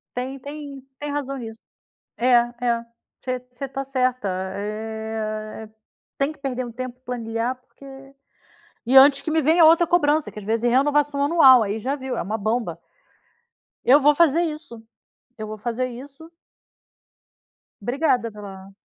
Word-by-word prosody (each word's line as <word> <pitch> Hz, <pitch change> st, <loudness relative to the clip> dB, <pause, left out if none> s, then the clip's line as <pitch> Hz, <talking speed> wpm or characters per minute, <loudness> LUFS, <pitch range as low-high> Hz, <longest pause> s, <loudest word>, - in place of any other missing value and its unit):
tem 260 Hz, +2 st, -4 dB
tem 285 Hz, 0 st, -8 dB, 0.2 s
tem 290 Hz, 0 st, -5 dB
razão 275 Hz, -1 st, -3 dB
nisso. 225 Hz, -2 st, -8 dB, 0.6 s
É, 240 Hz, -, 0 dB
é. 240 Hz, -1 st, +2 dB, 0.4 s
Você 255 Hz, -1 st, -2 dB
você 255 Hz, +2 st, -6 dB
tá 270 Hz, +1 st, -4 dB
certa. 255 Hz, -4 st, -1 dB, 0.3 s
Eh, 215 Hz, +1 st, -5 dB, 0.5 s
tem 275 Hz, +2 st, 0 dB
que 310 Hz, -, -16 dB
perder 255 Hz, -2 st, -3 dB
um 240 Hz, -, -8 dB
tempo 250 Hz, +1 st, -7 dB
e 260 Hz, -, -47 dB
planilhar 235 Hz, 0 st, -3 dB
porque 255 Hz, +2 st, -19 dB, 1.0 s
e 255 Hz, +3 st, +3 dB
antes 275 Hz, +1 st, +8 dB
que 315 Hz, -, -3 dB
me 315 Hz, 0 st, +2 dB
venha 320 Hz, +4 st, +5 dB
outra 330 Hz, +2 st, +6 dB
cobrança, 310 Hz, -3 st, +2 dB
que -, -, -11 dB
às 210 Hz, -, -8 dB
vezes 225 Hz, +2 st, -1 dB
é -, -, +4 dB
renovação 285 Hz, +3 st, +2 dB
anual, 275 Hz, -6 st, +7 dB
aí 210 Hz, +1 st, -2 dB
já 265 Hz, +6 st, -2 dB
viu, 260 Hz, -2 st, -5 dB
é -, -, -1 dB
uma 210 Hz, +5 st, -3 dB
bomba. 215 Hz, -5 st, -2 dB, 1.1 s
Eu 280 Hz, +4 st, +6 dB
vou 295 Hz, +1 st, +5 dB
fazer 335 Hz, +1 st, +3 dB
isso. 305 Hz, -8 st, -5 dB, 0.6 s
Eu 215 Hz, -1 st, -6 dB
vou 215 Hz, 0 st, -7 dB
fazer 240 Hz, +3 st, -2 dB
isso. 275 Hz, +6 st, -11 dB, 1.5 s
Obrigada 245 Hz, -1 st, 0 dB
pela 195 Hz, -2 st, -11 dB
255 Hz, 155 wpm, -23 LUFS, 225-285 Hz, 1.5 s, antes